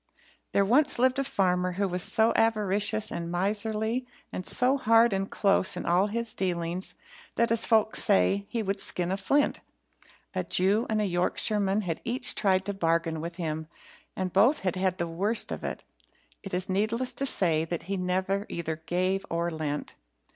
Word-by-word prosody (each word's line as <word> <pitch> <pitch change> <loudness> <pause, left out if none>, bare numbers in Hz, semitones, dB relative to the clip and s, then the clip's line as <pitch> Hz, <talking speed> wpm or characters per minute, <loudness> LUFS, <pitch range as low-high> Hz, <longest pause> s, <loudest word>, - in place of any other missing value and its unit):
There 200 - +2
once 280 +8 +2
lived 260 +2 +2
a - - +1
farmer 180 -7 0
who 200 +2 -1
was 180 0 -2
so 225 +3 +3
avaricious 210 -1 +2
and 170 0 -4
miserly, 215 +6 -1 0.3
and 185 - -4
so 255 +2 +4
hard 230 -1 +4
and 195 0 -2
close 195 -2 +2
in - - -5
all 180 +4 +3
his 230 +1 -2
dealings 175 -3 -3 0.4
that, 235 -1 +1
as 230 -1 +4
folks 220 -2 +3
say, 200 -1 +2
he 230 -2 -2
would 195 0 -2
skin 180 -2 -1
a 190 - -1
flint. 280 +9 +1 0.7
A - - -1
Jew 200 +6 +1
and 215 -1 +1
a - - +1
Yorkshireman 195 +3 0
had 170 -5 -4
each 245 +2 0
tried 190 -2 +1
to 200 - -2
bargain 165 -3 0
with 170 +1 -6
him, 160 -2 -4 0.5
and 185 -1 -3
both 235 +10 +4
had 185 -2 -1
had 185 -1 0
the 170 - -1
worst 200 +7 -1
of - - -5
it. - - -5 0.6
It 195 - -8
is 180 +1 -1
needless 220 +6 0
to 275 - 0
say 165 -9 +2
that 165 0 -4
he 195 +4 -3
never 190 +2 -1
either 160 -2 -4
gave 185 +2 0
or 170 +1 -1
lent. 150 -2 -4
195 Hz, 180 wpm, -27 LUFS, 180-220 Hz, 0.7 s, so